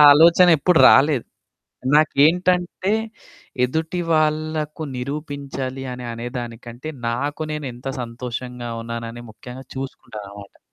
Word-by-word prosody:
ఆలోచన 170 +4 +7
ఎప్పుడు 180 +2 +4
రాలేదు. 135 -2 +4 0.7
నాకేంటంటే 175 +5 +3 0.7
ఎదుటి 160 +7 -2
వాళ్ళకు 155 0 0
నిరూపించాలి 140 -1 -5
అని 125 0 -7
అనే 115 +1 -5
దానికంటే 120 +3 -8 0.2
నాకు 140 +6 -2
నేను 150 -1 -4
ఎంత 125 +3 -9
సంతోషంగా 120 0 -6
ఉన్నానని 115 0 -6
ముఖ్యంగా 125 +4 -10
చూసుకుంటాననమాట. 105 -6 -8
135 Hz, 95 wpm, -22 LUFS, 120-155 Hz, 0.7 s, ఆలోచన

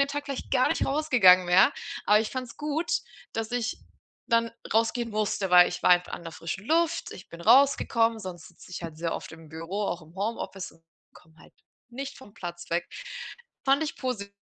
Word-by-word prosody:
dem 280 - +3
Tag 290 0 -4
vielleicht 275 -2 -5
gar 255 -1 +3
nicht - - 0
rausgegangen 250 - +5
wäre, 180 +2 +6 0.3
aber 210 +1 +6
ich 220 - -3
fand's 255 -2 -6
gut, 305 +3 -2 0.4
dass 225 0 -3
ich 245 -1 -2 0.5
dann 230 -1 +2 0.2
rausgehen 230 +1 +1
musste, 210 -2 -1
weil 180 0 +8
ich 180 - -6
war - - +4
einfach 180 0 +4
an - - -9
der 165 - -7
frischen 170 +5 -6
Luft, 330 +2 +1
ich 180 - -12
bin 170 - -11
rausgekommen, 230 -2 +4
sonst 180 -4 -8
sitze 175 +1 -17
ich 180 - -6
halt 165 -2 -7
sehr 165 0 -2
oft - - -7
im 160 -1 -13
Büro, 165 +6 -4
auch 175 -3 -3
im 160 +2 -17
Homeoffice 195 -2 -4
und 165 - -25 0.3
komme 160 0 -20
halt - - -18 0.4
nicht 270 +3 -6
vom 235 -6 -14
Platz 175 -5 -8
weg. 170 +1 0 0.8
Fand 275 +3 +4
ich 310 - -3
posi 210 -6 -4
210 Hz, 200 wpm, -27 LUFS, 180-255 Hz, 0.8 s, weil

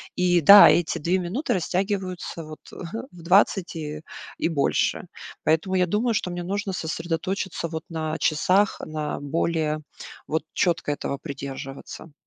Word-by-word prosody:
И 180 -1 +3
да, 200 +7 +10
эти 170 -1 +2
2 170 +4 +1
минуты 185 - -3
растягиваются 185 -2 -2
вот, 155 0 -10
ага, 185 +6 -6
в 175 -1 -14
20 185 +1 +3
и 155 -1 -5 0.4
и - - 0
больше. 145 -4 0 0.4
Поэтому 160 +5 +1
я 180 -1 +3
думаю, 225 +6 +1
что 195 - -1
мне 175 0 -4
нужно 200 +2 -2
сосредоточиться 170 +2 -3
вот 160 -1 -5
на 160 -1 -3
часах, 185 +6 +2
на 155 -1 -4
более 155 +1 -1 0.5
вот 160 0 -1
чётко 165 -4 +1
этого 140 -1 -3
придерживаться. 135 +1 -8
170 Hz, 140 wpm, -24 LUFS, 155-185 Hz, 0.5 s, да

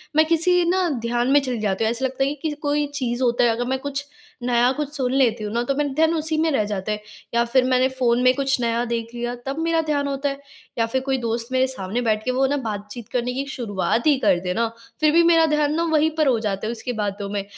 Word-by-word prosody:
मैं 315 0 +5
किसी 345 +2 +3
ना 370 -1 +2
ध्यान 240 +1 0
में 290 - +6
चली 255 -3 -3
जाती 205 0 -1
हूँ, 220 - +2
ऐसा 250 +3 -1
लगता 265 +1 -1
है 275 - +1
कि 295 - -4
किसी 305 -2 -2
कोई 290 0 +1
चीज़ 250 -2 -1
होता 240 0 +2
है 240 - +5
अगर 235 +2 -1
मैं 265 0 0
कुछ 285 0 -4 0.4
नया 245 0 +3
कुछ 295 -2 -2
सुन 260 -2 -1
लेती 240 -5 +2
हूँ 210 +1 -4
ना 235 +1 0
तो 275 +2 -1
मेरा 290 -1 0
ध्यान 320 +3 +3
उसी 315 0 -1
में 320 0 +2
रह 220 -6 +2
जाता 205 0 -3
है। 210 0 -3 0.3
या 235 - +4
फिर 250 +2 +3
मैंने 255 0 +3
फ़ोन 250 -2 +1
में 255 0 +6
कुछ 270 -2 0
नया 235 0 0
देख 230 -1 -2
लिया 240 +1 -3
तब 275 +4 -3
मेरा 330 0 +1
ध्यान 290 -2 -1
होता 280 +1 -1
है। 275 0 -6 0.4
या 230 - +2
फिर 260 +3 -1
कोई 265 0 -1
दोस्त 230 0 -2
मेरे 260 0 +2
सामने 230 -1 -3
बैठ 215 -2 0
के 255 - +1
वो 265 +1 +2
ना 285 +1 0
बातचीत 210 +2 -6
करने 250 0 -1
की 275 +2 -3
शुरुआत 230 +1 -1
ही 290 -3 +5
कर 195 -7 +3
दे 180 0 -1
ना 230 +2 +1 0.3
फिर 305 -1 +4
भी 340 0 +6
मेरा 330 -1 +5
ध्यान 300 -1 +1
ना 335 - +1
वहीं 310 0 +3
पर 305 -3 +3
हो 240 -4 +3
जाता 205 -1 -2
है - - -1
उसकी 240 +1 -5
बातों 205 -2 -3
में। 200 -1 -2
255 Hz, 270 wpm, -22 LUFS, 230-290 Hz, 0.4 s, में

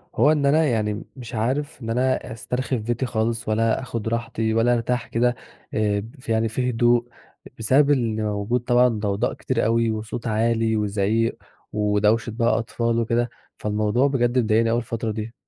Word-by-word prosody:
هو 150 - +5
إن 145 -2 +1
أنا 155 +3 +4
يعني 110 -4 -1
مش 120 -3 -8
عارف 135 +6 -2
إن 115 - -5
أنا 125 0 0
أسترخي 125 +3 -2
في 110 - -6
بيتي 120 +3 -1
خالص 115 -1 -1
ولا 115 +3 +1
آخُد 115 -4 -4
راحتي 115 -1 -1
ولا 115 +2 +3
أرتاح 120 0 -1
كده، 120 +1 +1 0.4
آآ 105 -1 +1 0.2
يعني 115 0 +1
في 125 +3 -1
هدوء 120 0 +2 0.5
بسبب 140 +6 +4
اللي 115 -5 +1
موجود 105 +3 0
طبعًا 120 +1 +4
ضوضاء 105 0 -1
كتير 130 - -1
أوي 115 0 +2
وصوت 110 +2 -5
عالي 115 0 +1
وزعيق 105 +2 0 0.4
ودوشة 105 +2 +2
بقى 115 +1 +1
أطفال 115 0 -1
وكده، 115 +1 0 0.3
فالموضوع 105 +5 +1
بجد 125 -2 +1
مضايقني 115 0 +2
أوي 115 - +2
الفترة 115 -1 -3
دي. 110 +2 -5
115 Hz, 165 wpm, -23 LUFS, 110-120 Hz, 0.5 s, هو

